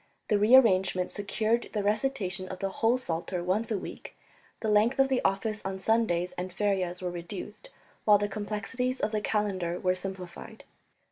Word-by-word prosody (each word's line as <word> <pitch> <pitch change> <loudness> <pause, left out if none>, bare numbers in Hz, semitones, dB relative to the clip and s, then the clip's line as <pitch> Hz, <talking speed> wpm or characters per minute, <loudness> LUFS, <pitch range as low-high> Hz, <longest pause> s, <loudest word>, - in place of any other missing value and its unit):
The 210 -2 +3
rearrangement 200 -5 +5
secured 215 +3 0
the 210 -2 -1
recitation 205 -4 0
of 185 - -6
the 195 +1 -2
whole 230 +5 +2
Psalter 175 -5 -3
once 200 +6 0
a 215 - 0
week, - - -9 0.4
the 220 - -2
length 215 +5 +3
of 270 0 +4
the 260 -1 +1
office 210 +2 0
on 190 0 -3
Sundays 190 -4 +1
and 180 +1 -3
ferias 185 -2 -1
was 180 -1 -2
reduced, 195 - -7 0.3
while 210 -1 +6
the 205 0 -1
complexities 215 +5 -3
of 210 - 0
the 215 -1 -1
calendar 190 -5 -1
were 185 0 +2
simplified. 185 -1 -6
205 Hz, 165 wpm, -29 LUFS, 185-220 Hz, 0.4 s, while